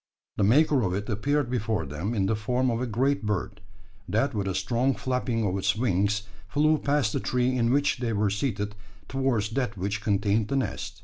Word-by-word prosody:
The -, -, +2 dB
maker 140 Hz, +6 st, +4 dB
of 90 Hz, -4 st, 0 dB
it 100 Hz, +1 st, -3 dB
appeared 140 Hz, +6 st, 0 dB
before 110 Hz, -7 st, -1 dB
them 80 Hz, -, -3 dB
in 100 Hz, -3 st, +1 dB
the 110 Hz, -, +1 dB
form 125 Hz, +3 st, 0 dB
of 115 Hz, +1 st, -1 dB
a 125 Hz, -, -1 dB
great 130 Hz, +4 st, +1 dB
bird, 105 Hz, 0 st, -2 dB, 0.5 s
that 135 Hz, +6 st, +1 dB
with 100 Hz, -3 st, -2 dB
a 95 Hz, -, -1 dB
strong 120 Hz, +7 st, +1 dB
flapping 125 Hz, -3 st, -1 dB
of 95 Hz, -2 st, 0 dB
its 95 Hz, +2 st, +1 dB
wings 105 Hz, -2 st, +1 dB, 0.3 s
flew 155 Hz, +6 st, +3 dB
past 145 Hz, -6 st, +1 dB
the -, -, 0 dB
tree 125 Hz, 0 st, 0 dB
in 120 Hz, -1 st, +2 dB
which 145 Hz, +2 st, +2 dB
they 120 Hz, -2 st, -1 dB
were 105 Hz, -1 st, +1 dB
seated, 105 Hz, -2 st, -2 dB, 0.3 s
towards 130 Hz, -6 st, 0 dB
that 120 Hz, -4 st, -2 dB
which 100 Hz, +3 st, -2 dB
contained 105 Hz, 0 st, +1 dB
the 135 Hz, -, -1 dB
nest. 100 Hz, -6 st, -3 dB
110 Hz, 200 wpm, -27 LUFS, 100-130 Hz, 0.5 s, maker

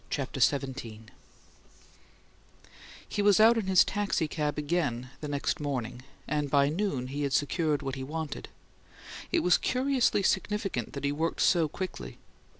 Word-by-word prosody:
CHAPTER 135 Hz, -1 st, -3 dB
XVII 130 Hz, -4 st, 0 dB, 2.1 s
He 205 Hz, -, -2 dB
was 205 Hz, -1 st, +5 dB
out 225 Hz, +2 st, +7 dB
in 220 Hz, -4 st, -2 dB
his 190 Hz, -1 st, +6 dB
taxicab 160 Hz, -7 st, -1 dB
again 145 Hz, -6 st, -1 dB
the 150 Hz, -, -5 dB
next 145 Hz, +3 st, -1 dB
morning, 125 Hz, -4 st, -3 dB, 0.3 s
and 150 Hz, 0 st, -1 dB
by 140 Hz, 0 st, +3 dB
noon 160 Hz, -6 st, -1 dB
he 145 Hz, +2 st, -4 dB
had 140 Hz, -2 st, -1 dB
secured 150 Hz, 0 st, +1 dB
what 135 Hz, -, -3 dB
he 135 Hz, 0 st, -5 dB
wanted. 155 Hz, +1 st, -5 dB, 0.8 s
It -, -, +2 dB
was 180 Hz, 0 st, +4 dB
curiously 255 Hz, -5 st, +1 dB
significant 200 Hz, +2 st, -1 dB
that 140 Hz, -2 st, -6 dB
he 140 Hz, -, +1 dB
worked 160 Hz, +3 st, -1 dB
so 170 Hz, -3 st, +4 dB
quickly. 150 Hz, -, -6 dB
150 Hz, 145 wpm, -29 LUFS, 140-185 Hz, 2.1 s, out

